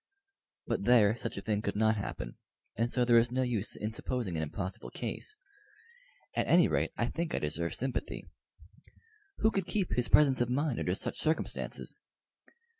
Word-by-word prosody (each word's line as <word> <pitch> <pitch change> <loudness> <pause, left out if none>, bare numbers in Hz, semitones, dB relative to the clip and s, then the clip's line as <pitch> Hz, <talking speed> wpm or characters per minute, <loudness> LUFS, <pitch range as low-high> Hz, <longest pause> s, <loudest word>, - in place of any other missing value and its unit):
But - - -1
there 115 -3 +6
such 115 -3 -5
a 100 - -5
thing 105 -1 0
could 100 - -2
not 110 +1 +3
happen, 100 - -5 0.4
and 115 +2 0
so 125 -1 +3
there 120 -1 +7
is 120 +1 +1
no 130 +1 +1
use 115 -4 0
in 105 +1 -4
supposing 115 -6 -2
an 80 - 0
impossible 95 +7 -4
case. 430 - -5 1.0
At - - +1
any - - +6
rate - - +1
I - - +2
think 165 -1 -2
I - - 0
deserve 80 +3 -2
sympathy. 130 0 -3 1.2
Who 220 - +5
could 195 -3 -1
keep 195 -4 -1
his 125 -1 0
presence 135 -4 +5
of 120 - +1
mind 140 0 0
under 90 - 0
such - - -3
circumstances? 160 +1 -2
120 Hz, 175 wpm, -31 LUFS, 105-130 Hz, 1.2 s, there